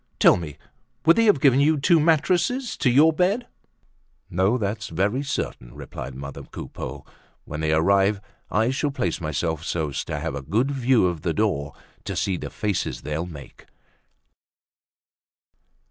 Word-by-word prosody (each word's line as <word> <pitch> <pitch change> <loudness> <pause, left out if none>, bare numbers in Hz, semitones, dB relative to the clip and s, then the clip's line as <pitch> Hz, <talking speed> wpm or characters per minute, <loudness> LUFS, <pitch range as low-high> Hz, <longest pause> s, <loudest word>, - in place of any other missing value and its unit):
Tell - - +6
me, 75 -4 -6 0.5
would 165 - +7
they 230 - +3
have 205 -9 +4
given 135 -1 +5
you 150 +1 +3
two 165 +4 +4
mattresses 175 - +1
to 140 - +2
your 150 +6 +5
bed?" 195 +9 +1 0.9
"No, 95 +7 +2
that's 105 -2 -3
very 100 +10 0
certain," - - -4
replied 65 - -8
mother 70 +1 -7
Coupeau. - - -8 0.4
"When 75 - -6
they 80 0 0
arrive 95 +5 +3 0.3
I 110 +4 +2
shall 145 +2 0
place 90 - -2
myself 80 +1 -2
so 80 -3 -2
as 70 - -3
to - - -3
have 80 0 -3
a 70 - -4
good 110 - 0
view 130 -5 +3
of 85 -4 -1
the 85 0 -1
door 75 -10 -1 0.3
to - - -4
see 95 - 0
the - - -5
faces 100 -4 -2
they'll 80 +3 -3
make." 75 -5 -12
100 Hz, 160 wpm, -24 LUFS, -, 0.9 s, would